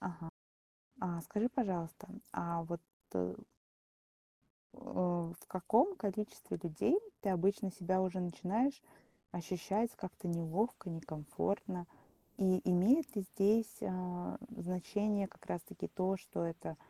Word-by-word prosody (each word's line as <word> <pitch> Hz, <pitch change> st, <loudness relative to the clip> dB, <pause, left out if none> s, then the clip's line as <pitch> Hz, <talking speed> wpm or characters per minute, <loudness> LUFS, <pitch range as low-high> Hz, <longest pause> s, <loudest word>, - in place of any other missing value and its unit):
Ага. 170 Hz, -2 st, -5 dB, 0.7 s
А 175 Hz, -3 st, -1 dB
скажи, 210 Hz, +7 st, +1 dB
пожалуйста, 200 Hz, -, -1 dB, 0.2 s
а 170 Hz, -1 st, -1 dB
вот 170 Hz, +1 st, -3 dB, 1.9 s
э, -, -, -16 dB, 0.5 s
в 175 Hz, -, -15 dB
каком 235 Hz, -, +4 dB
количестве 210 Hz, -, -2 dB
людей 170 Hz, -, +3 dB, 0.2 s
ты 200 Hz, -, -1 dB
обычно 195 Hz, +3 st, +3 dB
себя 185 Hz, 0 st, +1 dB
уже 185 Hz, 0 st, 0 dB
начинаешь 210 Hz, -, +1 dB, 0.5 s
ощущать 190 Hz, +6 st, 0 dB
как-то 185 Hz, -1 st, -5 dB
неловко, 170 Hz, +4 st, 0 dB
некомфортно? 165 Hz, +4 st, -2 dB, 0.5 s
И 185 Hz, -2 st, +4 dB
имеет 225 Hz, -, +5 dB
ли 200 Hz, -, +1 dB
здесь, 215 Hz, +3 st, +4 dB
а, 180 Hz, -1 st, -2 dB, 0.2 s
значение 200 Hz, +3 st, +1 dB
как -, -, -17 dB
раз 175 Hz, -, -1 dB
таки -, -, -6 dB
то, 190 Hz, 0 st, +1 dB
что 175 Hz, -, -3 dB
это 165 Hz, -1 st, -4 dB
185 Hz, 115 wpm, -37 LUFS, 175-210 Hz, 1.9 s, имеет